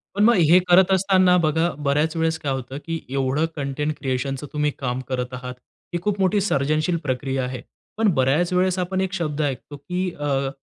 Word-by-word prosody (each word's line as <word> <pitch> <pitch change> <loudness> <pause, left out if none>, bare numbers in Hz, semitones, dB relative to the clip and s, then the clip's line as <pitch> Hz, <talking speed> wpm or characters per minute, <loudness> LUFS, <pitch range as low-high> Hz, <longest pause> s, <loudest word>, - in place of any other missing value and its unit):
पण 205 - +2
मग 235 - +6 0.2
हे 180 - +8
करत 180 +1 +6
असताना 185 -1 +4
बघा 160 +1 +2 0.2
बऱ्याच 150 +3 +1
वेळेस 160 -1 0
काय 140 - -2
होतं 130 0 -4
की 165 -1 -3
एवढं 135 +3 0
कंटेंट 145 +1 -2
क्रिएशनचं 135 +2 -3
तुम्ही 150 0 +1
काम 125 -2 -2
करत 125 -1 -3
आहात, 125 0 -6 0.4
ही 175 - 0
खूप 205 +1 -1
मोठी 195 +2 +2
सर्जनशील 155 0 +1
प्रक्रिया 135 -1 -2
आहे. 125 -1 -5 0.4
पण 225 - +2
बऱ्याच 145 +6 +2
वेळेस 185 +1 +2
आपण 185 +1 -1
1 190 0 -2
शब्द 155 -5 -2
ऐकतो, 145 0 -3
की 180 +6 -3
अ, 140 -2 0
150 Hz, 185 wpm, -23 LUFS, 135-180 Hz, 0.4 s, हे